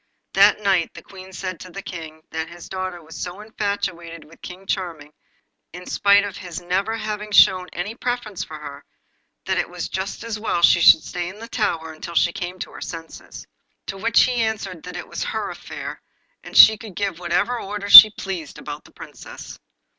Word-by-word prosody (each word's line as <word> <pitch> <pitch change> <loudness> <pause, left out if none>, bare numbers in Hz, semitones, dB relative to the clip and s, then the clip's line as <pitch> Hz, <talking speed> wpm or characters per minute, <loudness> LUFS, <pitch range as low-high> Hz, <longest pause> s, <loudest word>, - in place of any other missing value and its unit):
That 200 +2 +5
night 190 -4 +1
the - - -11
Queen 190 -1 -13
said 185 -1 -6
to 185 - -10
the 195 +2 -9
King, 160 -2 -9
that 160 0 -4
his 170 0 -12
daughter 185 -2 -5
was 160 +1 -13
so 180 +2 -6
infatuated 190 -6 -4
with 155 +2 -19
King 185 +1 -10
Charming, 165 -6 -4 0.6
in 180 +1 -10
spite 200 0 +3
of 205 -2 -6
his 180 -3 -7
never 190 +5 -2
having 215 -1 -5
shown 185 -2 +5
any 180 +6 -5
preference 235 -6 -4
for 155 - -9
her, 145 -2 -10 0.6
that - - 0
it - - -2
was - - -6
just 190 +4 -5
as 225 -2 -5
well 175 -5 -2
she 170 - +6
should 160 - +7
stay 175 0 -5
in 190 - -11
the 230 +2 -9
tower 165 -9 -2
until 170 +2 -9
she 170 +1 +2
came 180 0 -6
to - - -7
her - - -12
senses. 165 -2 -9 0.4
To 195 - -6
which 230 +4 +3
he 250 -2 0
answered 200 -6 -3
that - - -7
it - - -8
was - - -5
her - - -4
affair, - - -8 0.4
and - - -5
she 220 -1 +9
could 220 -6 -11
give 195 -4 -3
what 175 -1 -7
orders 205 0 -2
she 215 - +14
pleased 190 -7 -7
about 145 0 -8
the - - -18
Princess. - - -11
185 Hz, 200 wpm, -21 LUFS, 170-205 Hz, 0.6 s, she